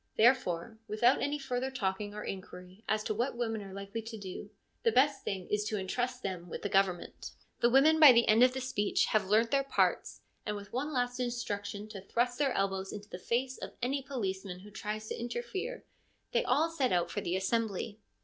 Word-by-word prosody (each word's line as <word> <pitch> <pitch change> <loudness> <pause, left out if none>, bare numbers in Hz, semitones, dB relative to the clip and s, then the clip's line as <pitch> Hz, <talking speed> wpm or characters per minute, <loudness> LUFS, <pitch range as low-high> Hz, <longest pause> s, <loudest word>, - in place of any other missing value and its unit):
Therefore, 220 -4 +3
without 235 +5 +3
any 285 +1 0
further 265 -2 -2
talking 205 -4 -2
or 210 - -5
inquiry 185 +1 -8
as 215 0 +1
to 215 - -1
what 240 +3 -1
women 225 -3 -1
are 195 -1 -9
likely 200 +3 -5
to 225 0 -7
do, 200 0 -7 0.3
the 230 - +3
best 270 +4 +3
thing 190 -2 -3
is 210 0 +1
to 215 0 -1
entrust 245 +6 -2
them 180 -3 -4
with - - -6
the 205 - -1
government. 190 -3 0 0.3
The 235 - +4
women 295 +5 +5
by 300 -4 +11
the 235 -1 +4
end 220 +2 +5
of 255 0 +6
the 265 - -3
speech 210 -5 +1
have 210 -3 +2
learnt 220 +3 +3
their 275 - +4
parts, 275 - 0 0.2
and 210 - -2
with 205 -1 -9
one 280 +5 -1
last 245 -2 -1
instruction 210 -4 -3
to 200 -3 -7
thrust 245 +5 0
their 275 -3 +2
elbows 195 -1 -1
into 205 0 -8
the 180 - -7
face 255 +6 -1
of - - -7
any 275 +3 0
policeman 195 -8 -4
who 210 +2 -13
tries 215 +1 -4
to - - -4
interfere 245 - -4 0.5
they - - +2
all 305 +6 +2
set 270 -6 +1
out 175 -1 +1
for - - -2
the 175 - -1
assembly. 210 +1 -1
220 Hz, 205 wpm, -32 LUFS, 195-255 Hz, 0.5 s, by